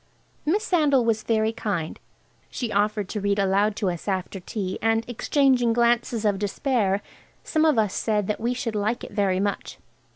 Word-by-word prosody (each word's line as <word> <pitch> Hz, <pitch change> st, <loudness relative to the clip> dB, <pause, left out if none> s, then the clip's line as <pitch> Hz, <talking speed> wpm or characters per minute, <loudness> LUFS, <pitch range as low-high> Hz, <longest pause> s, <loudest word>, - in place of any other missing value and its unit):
Miss 400 Hz, +7 st, +2 dB
Sandal 295 Hz, -, +3 dB
was 225 Hz, -1 st, +1 dB
very 220 Hz, 0 st, +1 dB
kind. 170 Hz, -8 st, -3 dB, 0.5 s
She 240 Hz, -4 st, -4 dB
offered 210 Hz, 0 st, 0 dB
to 210 Hz, -, -3 dB
read 200 Hz, 0 st, +1 dB
aloud 200 Hz, +2 st, +2 dB
to 195 Hz, -4 st, 0 dB
us 175 Hz, +2 st, -8 dB
after 190 Hz, 0 st, -2 dB
tea, 185 Hz, 0 st, -4 dB
and, 225 Hz, +1 st, +1 dB
exchanging 245 Hz, 0 st, +2 dB
glances 235 Hz, -1 st, +1 dB
of 200 Hz, -2 st, +1 dB
despair, 205 Hz, -1 st, 0 dB, 0.4 s
some 315 Hz, 0 st, +1 dB
of 225 Hz, -10 st, +3 dB
said 210 Hz, -1 st, 0 dB
that 210 Hz, -, -2 dB
we 240 Hz, +2 st, 0 dB
should 240 Hz, -2 st, -3 dB
like 215 Hz, +3 st, -1 dB
it -, -, -8 dB
very 195 Hz, -3 st, +1 dB
much. 200 Hz, 0 st, -3 dB
215 Hz, 170 wpm, -24 LUFS, 200-240 Hz, 0.5 s, Sandal